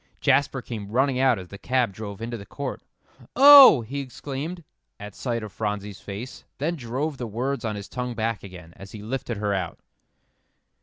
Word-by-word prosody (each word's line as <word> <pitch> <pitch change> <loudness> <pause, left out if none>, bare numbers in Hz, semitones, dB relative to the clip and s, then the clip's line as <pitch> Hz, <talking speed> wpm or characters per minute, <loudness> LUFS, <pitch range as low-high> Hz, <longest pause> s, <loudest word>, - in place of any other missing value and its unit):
Jasper 140 -2 +2
came 105 -4 -7
running 130 +2 +1
out 130 -3 +4
as 90 -2 -9
the 100 - -10
cab 125 -4 0
drove 105 +1 -7
into 120 +1 -4
the 105 - -8
court. 140 +5 -6 0.5
"Oh!" 275 - +10
he 130 +6 -5
exclaimed, 140 +5 -6 0.4
at 105 -1 -8
sight 120 -1 -3
of 105 - -7
Phronsie's 105 -1 -4
face, 105 +6 -8
then 160 +5 -1
drove 135 +3 -3
the 120 - -4
words 130 +6 -3
on 110 -2 -2
his 100 -2 -7
tongue 125 +3 -4
back 115 -1 -2
again, 90 -4 -12
as 100 0 -12
he 105 -2 -8
lifted 120 0 -4
her 105 -1 -1
out. 90 -5 -3
120 Hz, 185 wpm, -25 LUFS, 105-135 Hz, 0.5 s, Oh